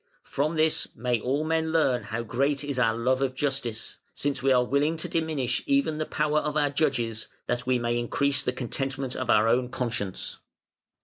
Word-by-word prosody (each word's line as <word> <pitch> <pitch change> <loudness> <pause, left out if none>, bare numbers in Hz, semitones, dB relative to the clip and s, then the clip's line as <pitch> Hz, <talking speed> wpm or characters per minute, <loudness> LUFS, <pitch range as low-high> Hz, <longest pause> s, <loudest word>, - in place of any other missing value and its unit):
From 150 +4 -1
this 155 0 +2
may 120 -1 0
all 140 +6 0
men 160 0 0
learn 135 -7 +2
how 110 +3 -3
great 140 +5 0
is 140 -3 -2
our 115 -2 +3
love 130 +3 +1
of 130 -1 0
justice, 130 -5 -2 0.2
since 140 -1 -1
we 135 +1 +3
are 125 -1 +5
willing 145 +5 +1
to 160 - -3
diminish 155 -7 -1
even 275 - +2
the 155 - -2
power 150 0 +1
of 150 0 -2
our 145 -1 +2
judges, 115 -7 0 0.2
that 120 +1 -2
we 130 -1 +3
may 120 0 0
increase 140 +3 +1
the - - 0
contentment 130 +1 -3
of 130 - -4
our 110 +1 +5
own 125 +2 +2
conscience". 120 -7 -3
135 Hz, 190 wpm, -27 LUFS, 120-150 Hz, 0.2 s, are